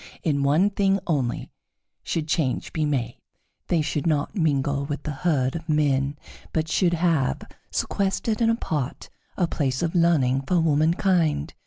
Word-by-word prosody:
In 145 Hz, -3 st, +1 dB
one 155 Hz, +9 st, +3 dB
thing 195 Hz, -1 st, +2 dB
only 135 Hz, -8 st, -1 dB, 0.5 s
should 160 Hz, -2 st, -3 dB
change 155 Hz, -5 st, -1 dB
be 155 Hz, -2 st, 0 dB
made: 125 Hz, -5 st, -2 dB, 0.5 s
they 165 Hz, -3 st, +2 dB
should 150 Hz, +2 st, -2 dB
not 150 Hz, -3 st, 0 dB
mingle 145 Hz, -5 st, +1 dB
with 145 Hz, 0 st, -4 dB
the 150 Hz, -, -3 dB
herd 140 Hz, -4 st, 0 dB
of 165 Hz, 0 st, -7 dB
men, 145 Hz, -2 st, +1 dB, 0.4 s
but 160 Hz, 0 st, 0 dB
should 175 Hz, +1 st, +2 dB
have, 160 Hz, -, +1 dB, 0.3 s
sequestered 200 Hz, +3 st, -1 dB
and 225 Hz, -, +4 dB
apart, 155 Hz, -, -2 dB, 0.3 s
a 180 Hz, -, +3 dB
place 135 Hz, -4 st, -1 dB
of 165 Hz, -, -1 dB
learning 155 Hz, -7 st, +3 dB
for 180 Hz, -, +3 dB
womankind. 160 Hz, -, +2 dB
155 Hz, 150 wpm, -24 LUFS, 140-170 Hz, 0.5 s, and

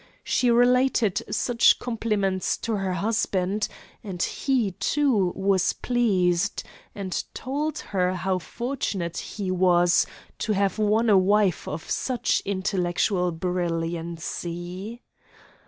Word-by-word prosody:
She 250 Hz, -, +1 dB
related 245 Hz, -3 st, +3 dB
such 240 Hz, -2 st, +3 dB
compliments 210 Hz, -6 st, -1 dB
to 225 Hz, -2 st, 0 dB
her 190 Hz, -2 st, -1 dB
husband; 200 Hz, 0 st, 0 dB, 0.4 s
and 190 Hz, -5 st, -6 dB
he, 255 Hz, -7 st, 0 dB
too, 250 Hz, -11 st, +2 dB
was 190 Hz, -1 st, +2 dB
pleased, 200 Hz, -6 st, +1 dB, 0.3 s
and 190 Hz, -3 st, -3 dB
told 295 Hz, +4 st, -2 dB, 0.2 s
her 185 Hz, -1 st, +1 dB
how 185 Hz, 0 st, -1 dB
fortunate 200 Hz, -6 st, -3 dB
he 195 Hz, -3 st, -4 dB
was 175 Hz, -1 st, +4 dB, 0.3 s
to 215 Hz, -, 0 dB
have 200 Hz, +1 st, 0 dB
won 215 Hz, +2 st, +2 dB
a 200 Hz, -3 st, +6 dB
wife 200 Hz, -1 st, +2 dB
of 155 Hz, +2 st, -5 dB
such 255 Hz, -2 st, 0 dB
intellectual 185 Hz, -1 st, 0 dB
brilliancy. 175 Hz, +3 st, -4 dB
195 Hz, 105 wpm, -25 LUFS, 180-230 Hz, 0.4 s, a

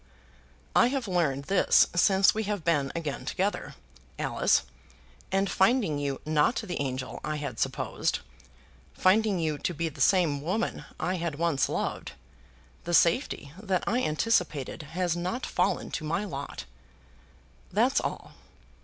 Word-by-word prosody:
"I 240 Hz, -, +6 dB
have 260 Hz, -3 st, -2 dB
learned 160 Hz, -7 st, 0 dB
this 195 Hz, +6 st, +4 dB
since 190 Hz, +2 st, +5 dB
we 220 Hz, 0 st, -2 dB
have 205 Hz, -5 st, -3 dB
been 145 Hz, -5 st, +2 dB
again 155 Hz, -4 st, -3 dB
together, 195 Hz, +2 st, -2 dB, 0.4 s
Alice; -, -, +2 dB, 0.7 s
and 195 Hz, +1 st, +2 dB
finding 195 Hz, -, +2 dB
you, 140 Hz, -2 st, -2 dB
not 155 Hz, +8 st, +2 dB
the 190 Hz, -9 st, -3 dB
angel 130 Hz, -2 st, -4 dB
I 155 Hz, -, -2 dB
had 145 Hz, -6 st, -5 dB
supposed, -, -, -1 dB, 0.8 s
finding 205 Hz, +1 st, +3 dB
you 155 Hz, -3 st, -1 dB
to 175 Hz, -, -2 dB
be 165 Hz, +2 st, -1 dB
the 150 Hz, -, -9 dB
same 165 Hz, -7 st, +3 dB
woman 190 Hz, +9 st, -2 dB
I 180 Hz, +3 st, -1 dB
had 170 Hz, -3 st, -3 dB
once 160 Hz, -3 st, +1 dB
loved, -, -, -3 dB, 0.7 s
the 175 Hz, 0 st, +1 dB
safety 170 Hz, -, +2 dB
that 190 Hz, -4 st, 0 dB
I 245 Hz, +2 st, +1 dB
anticipated 155 Hz, -, 0 dB, 0.2 s
has 180 Hz, -2 st, +1 dB
not 185 Hz, +9 st, -3 dB
fallen 180 Hz, 0 st, 0 dB
to 155 Hz, -, -3 dB
my 165 Hz, +7 st, -1 dB
lot. 140 Hz, -7 st, -6 dB, 1.1 s
That's 240 Hz, +8 st, +3 dB
all. -, -, -5 dB
175 Hz, 140 wpm, -28 LUFS, 150-200 Hz, 1.1 s, I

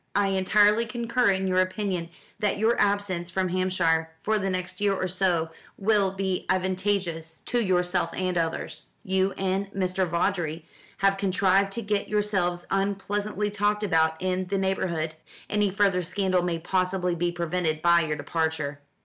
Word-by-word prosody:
I 200 Hz, -1 st, +3 dB
entirely 205 Hz, +4 st, +3 dB
concur 235 Hz, +1 st, +1 dB
in 190 Hz, 0 st, +1 dB
your 185 Hz, -1 st, +2 dB
opinion 185 Hz, -2 st, -1 dB, 0.3 s
that 205 Hz, -2 st, 0 dB
your 225 Hz, +3 st, +3 dB
absence 200 Hz, -4 st, 0 dB
from 185 Hz, +1 st, -1 dB
Hampshire 175 Hz, -3 st, +1 dB
for 215 Hz, 0 st, +1 dB
the 195 Hz, 0 st, -1 dB
next 185 Hz, +2 st, -4 dB
year 200 Hz, -1 st, +2 dB
or 185 Hz, -, -1 dB
so 175 Hz, -3 st, 0 dB, 0.3 s
will 205 Hz, -1 st, +2 dB
be 190 Hz, -1 st, -3 dB
advantageous 185 Hz, -3 st, -1 dB
to 245 Hz, -, -1 dB
yourself 180 Hz, -3 st, +1 dB
and 185 Hz, -1 st, -1 dB
others. 165 Hz, -1 st, -3 dB, 0.2 s
You 190 Hz, +1 st, +1 dB
and 195 Hz, +1 st, -2 dB
Mr. 185 Hz, -1 st, 0 dB
Vawdrey 170 Hz, -2 st, -1 dB, 0.3 s
have 195 Hz, 0 st, +2 dB
contrived 195 Hz, 0 st, +2 dB
to 235 Hz, -, -4 dB
get 205 Hz, -1 st, -1 dB
yourselves 190 Hz, -4 st, 0 dB
unpleasantly 205 Hz, +1 st, -1 dB
talked 210 Hz, +1 st, 0 dB
about 160 Hz, -4 st, +2 dB
in 185 Hz, 0 st, -1 dB
the 195 Hz, +2 st, -1 dB
neighbourhood. 185 Hz, -5 st, -1 dB, 0.4 s
Any 210 Hz, -1 st, +2 dB
further 195 Hz, -2 st, +2 dB
scandal 185 Hz, +1 st, 0 dB
may 175 Hz, -1 st, -1 dB
possibly 180 Hz, +1 st, 0 dB
be 175 Hz, +1 st, 0 dB
prevented 170 Hz, -2 st, -2 dB
by 170 Hz, 0 st, +5 dB
your 155 Hz, -2 st, -2 dB
departure." 150 Hz, -1 st, -2 dB
185 Hz, 155 wpm, -26 LUFS, 175-200 Hz, 0.4 s, by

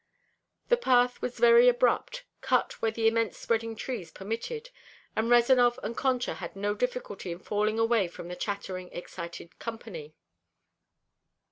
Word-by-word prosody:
The 485 Hz, -, +5 dB
path 250 Hz, -, +3 dB
was 250 Hz, -, -4 dB
very 480 Hz, +1 st, +7 dB
abrupt, -, -, +1 dB, 0.2 s
cut -, -, 0 dB
where 225 Hz, -, +2 dB
the 225 Hz, 0 st, +1 dB
immense 225 Hz, -1 st, +1 dB
spreading 225 Hz, 0 st, -1 dB
trees 220 Hz, -5 st, -5 dB
permitted, 445 Hz, -, -5 dB, 0.4 s
and 220 Hz, +1 st, 0 dB
Rezanov 240 Hz, 0 st, +5 dB
and 235 Hz, -, -3 dB
Concha 255 Hz, -2 st, 0 dB
had -, -, -7 dB
no 205 Hz, +1 st, -1 dB
difficulty 210 Hz, -5 st, -3 dB
in 170 Hz, -, -5 dB
falling 210 Hz, +3 st, -1 dB
away 225 Hz, -4 st, +3 dB
from 170 Hz, 0 st, -9 dB
the 180 Hz, -, -6 dB
chattering, 185 Hz, -1 st, -4 dB
excited 170 Hz, -1 st, -8 dB
company. 195 Hz, -10 st, -7 dB
225 Hz, 140 wpm, -29 LUFS, 200-250 Hz, 0.4 s, very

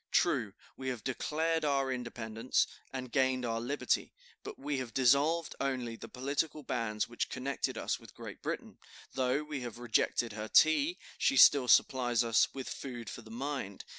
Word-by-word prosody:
True, -, -, +2 dB, 0.2 s
we 130 Hz, -, -6 dB
have 125 Hz, -4 st, -4 dB
declared 160 Hz, +5 st, -1 dB
our 135 Hz, -2 st, +1 dB
independence, 120 Hz, -1 st, -1 dB, 0.3 s
and 130 Hz, -2 st, -5 dB
gained 130 Hz, -2 st, +2 dB
our 115 Hz, -1 st, -1 dB
liberty, 140 Hz, +5 st, 0 dB, 0.3 s
but -, -, -8 dB
we 140 Hz, 0 st, -2 dB
have 120 Hz, -3 st, -6 dB
dissolved 140 Hz, +6 st, +3 dB
only 130 Hz, -4 st, -2 dB
the -, -, -10 dB
political 145 Hz, +4 st, -2 dB
bands 115 Hz, -4 st, -1 dB
which 120 Hz, -, -3 dB
connected 135 Hz, +2 st, -3 dB
us -, -, -2 dB
with -, -, -15 dB
Great -, -, -9 dB
Britain; -, -, -5 dB, 0.3 s
though 130 Hz, +2 st, +1 dB
we 150 Hz, -3 st, -5 dB
have 120 Hz, -2 st, -6 dB
rejected 120 Hz, -1 st, 0 dB
her 110 Hz, 0 st, -5 dB
tea, 280 Hz, -, +4 dB, 0.2 s
she 275 Hz, -, +2 dB
still 140 Hz, -3 st, +8 dB
supplies 120 Hz, -2 st, +4 dB
us 115 Hz, -1 st, +3 dB
with 135 Hz, -1 st, -6 dB
food 120 Hz, -6 st, -6 dB
for -, -, -8 dB
the 110 Hz, -, -15 dB
mind. 125 Hz, -4 st, -4 dB
130 Hz, 165 wpm, -32 LUFS, 120-140 Hz, 0.3 s, still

